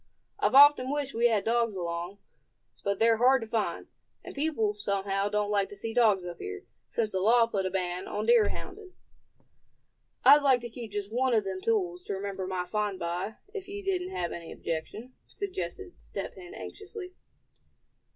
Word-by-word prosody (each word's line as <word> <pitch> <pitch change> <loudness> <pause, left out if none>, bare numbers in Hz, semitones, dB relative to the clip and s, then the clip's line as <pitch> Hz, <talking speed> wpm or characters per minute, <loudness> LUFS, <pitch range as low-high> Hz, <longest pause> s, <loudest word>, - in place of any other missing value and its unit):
I've 405 -10 +2
often 280 -2 +8
wished 285 -1 -2
we 235 +1 +4
had 215 -4 +1
dogs 230 -2 +1
along; 175 +1 -4 0.7
but 200 0 0
they're 225 +1 +4
hard 260 +3 +5
to - - -7
find; 220 -1 -2 0.4
and - - -9
people, 280 -8 0
somehow, 200 -1 -1
don't 210 0 0
like 200 -1 +1
to - - -10
see 225 +3 -5
dogs 215 -6 +3
up 175 -1 -7
here, 90 0 -6 0.2
since 220 -2 -1
the 190 - -1
law 230 +4 +5
put 200 -4 -1
a - - -1
ban 180 -1 -3
on 210 +1 -3
deer 230 -2 +5
hounding." 385 -1 -8 1.3
"I'd 285 +3 +9
like 265 -3 +4
to 240 - -6
keep 230 -3 -8
just 205 +1 -4
one 255 0 +2
of 215 - +3
them 190 -1 -4
tools, 180 -6 0
to 200 - -3
remember 195 -1 -4
my 185 -1 -2
find 205 +1 -1
by, 175 +5 -3 0.2
if 395 -3 -6
you 405 +1 -6
didn't 370 -2 -1
have 175 -1 -2
any 170 -1 -7
objection," 210 +10 -5
suggested 395 -1 -6
Step - - -6
Hen 365 +1 -11
anxiously. 405 -3 -8
220 Hz, 180 wpm, -29 LUFS, 195-260 Hz, 1.3 s, I'd